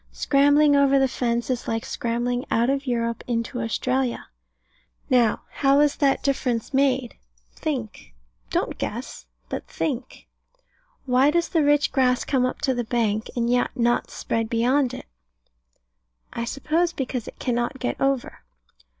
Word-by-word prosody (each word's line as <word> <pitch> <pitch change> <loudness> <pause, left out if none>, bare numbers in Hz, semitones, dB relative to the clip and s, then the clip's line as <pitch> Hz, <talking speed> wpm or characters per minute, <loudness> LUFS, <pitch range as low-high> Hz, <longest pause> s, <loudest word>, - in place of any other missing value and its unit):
Scrambling 285 +1 +4
over 280 -1 +4
the 270 0 +4
fence 240 -1 -1
is 245 - -3
like 225 +2 -2
scrambling 240 +1 -2
out 235 +3 +2
of 275 0 -2
Europe 235 -1 -1
into 235 +1 -2
Australia. 250 +2 -1 0.8
Now, 240 -4 +3
how 275 -1 +3
was 295 0 +3
that 275 -2 +2
difference 260 -3 -1
made? 265 -3 +1 0.4
Think. 240 - -5 0.3
Don't - - -2
guess, 65 - -5 0.2
but - - -5
think. 235 +11 -4 0.8
Why 260 +2 +4
does 340 +2 +1
the 325 -4 +2
rich 290 0 +3
grass 250 -2 +2
come 255 -2 +2
up - - -6
to 275 -3 +1
the 240 -1 -2
bank, 220 -2 -1
and 235 -1 0
yet 245 +1 +2
not 240 0 +1
spread 225 -1 -2
beyond 250 +3 +1
it? - - -9 1.3
I 235 - -3
suppose 320 +7 0
because 255 -5 -4
it - - -10
cannot 240 +1 -1
get 250 - -3
over. 270 -2 0
250 Hz, 145 wpm, -24 LUFS, 235-275 Hz, 1.3 s, Scrambling